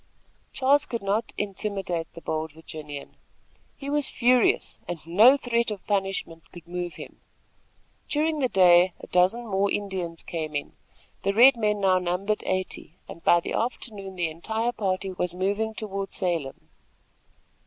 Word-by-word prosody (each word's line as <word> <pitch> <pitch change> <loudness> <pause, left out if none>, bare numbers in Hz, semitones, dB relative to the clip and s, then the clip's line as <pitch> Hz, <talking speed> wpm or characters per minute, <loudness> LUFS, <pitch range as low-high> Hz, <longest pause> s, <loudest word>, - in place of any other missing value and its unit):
Charles 275 +2 +3
could 235 -3 -4
not 205 +4 0
intimidate 195 -4 -3
the 170 - -9
bold 155 -1 -3
Virginian. 150 -2 -9 0.6
He 275 - -8
was 290 -1 0
furious, 245 0 +2
and 175 - -3
no 215 +11 +6
threat 235 -3 0
of 205 -3 -6
punishment 195 -5 -2
could 170 -2 -13
move 175 0 -4
him. - - -11 0.9
During 310 +1 +1
the 260 -3 +1
day, 180 -2 +6
a - - -9
dozen 185 +7 +2
more 200 -1 +1
Indians 185 -5 -3
came 155 -3 -4
in. 145 - -3 0.5
The 195 0 0
red 255 +4 +8
men 210 -3 0
now 185 -1 +4
numbered 180 +4 -1
eighty, 185 -3 -3
and 170 - -11
by 175 - +5
the - - -5
afternoon 210 -5 -3
the 175 -3 -1
entire 220 +8 -2
party 195 -3 -2
was 180 -1 -3
moving 205 +4 -1
toward 195 -2 -4
Salem. 165 -7 -3
195 Hz, 150 wpm, -26 LUFS, 175-220 Hz, 0.9 s, red